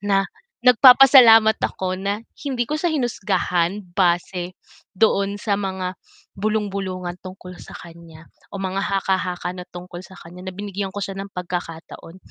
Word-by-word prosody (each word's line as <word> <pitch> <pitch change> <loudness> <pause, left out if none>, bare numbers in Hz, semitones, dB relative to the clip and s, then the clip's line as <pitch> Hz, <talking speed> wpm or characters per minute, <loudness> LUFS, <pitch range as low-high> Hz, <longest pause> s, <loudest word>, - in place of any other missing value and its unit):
Na 195 -1 +1 0.4
nagpapasalamat 250 -3 +7
ako 185 -1 -2
na 205 +3 -3 0.2
hindi 260 -5 -2
ko 295 - -7
siya 350 - +1
hinusgahan 200 -5 -1
base 180 -1 0 0.4
doon 200 -1 +2
sa 205 -1 -1
mga 190 -1 -3 0.5
bulung-bulungan 195 -4 -2
tungkol 185 -1 -10
sa - - -11
kaniya 165 -1 -14 0.2
o - - -7
mga 190 0 -2
haka-haka 190 -2 -2
na 180 - -7
tungkol 175 0 -9
sa 190 - -14
kaniya 175 +2 -12
na - - -3
binigyan 200 -1 -4
ko 205 - -7
siya 195 - -6
ng 200 - -8
pagkakataon, 175 -1 -7
195 Hz, 140 wpm, -21 LUFS, 180-205 Hz, 0.5 s, nagpapasalamat